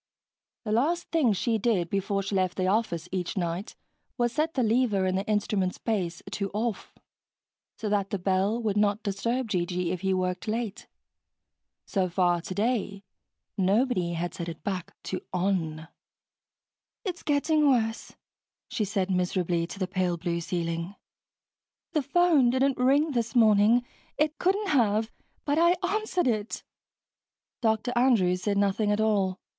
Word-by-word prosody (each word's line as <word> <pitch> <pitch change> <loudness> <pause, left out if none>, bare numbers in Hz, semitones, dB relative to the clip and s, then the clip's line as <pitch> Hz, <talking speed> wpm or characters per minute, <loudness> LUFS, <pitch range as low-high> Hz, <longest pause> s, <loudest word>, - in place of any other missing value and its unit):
The 215 - -3
last 305 +10 +1
thing 305 -9 +3
she 220 +3 0
did 195 -6 +1
before 195 0 0
she 195 - -4
left 185 -2 0
the 185 - 0
office 185 -4 0
each 185 0 -3
night 175 +2 -3 0.4
was 240 -1 +1
set 315 +2 0
the 260 - +2
lever 220 -4 +2
in 185 - +1
the 195 +3 -2
instrument's 205 -3 0
base 180 -7 -2
to 200 -1 -2
"off," 225 0 -3 0.8
so 220 - -4
that 200 -1 0
the 200 - -1
bell 195 +4 +1
would 210 -2 0
not 205 +1 +2
disturb 230 +4 -1
G.G. 180 -2 -1
if 180 -2 -3
he 190 0 0
worked 185 0 -1
late. 220 -1 -3 1.0
So 190 -3 0
far 175 -1 +2
today, 200 +1 -2 0.6
nobody 190 -2 +2
had 170 0 -3
set 170 -1 -5
it 165 - -9
back 185 -3 -4
to 185 - -4
"on." 175 -4 -1 1.2
"It's 360 -3 -4
getting 300 0 +2
worse," 225 -3 0 0.6
she 235 -4 -1
said 195 -1 -1
miserably 180 -2 0
to 195 - -8
the 185 -2 -1
pale 185 -2 -1
blue 170 0 -2
ceiling. 170 +1 -3 1.0
"The 310 -3 +1
phone 300 -3 +4
didn't 260 +1 +1
ring 280 +5 +3
this 235 -1 -2
morning 220 +1 +5 0.3
it 305 0 0
couldn't 395 +2 +1
have 220 -4 +2 0.3
but 290 +2 +1
I 340 +1 +5
answered 395 -1 0
it." 215 -3 -1 1.0
Dr. 225 +1 +1
Andrews 210 -8 +3
said 200 0 0
nothing 205 +1 +1
at 205 - +1
all. 200 -3 +1
205 Hz, 150 wpm, -27 LUFS, 185-240 Hz, 1.2 s, morning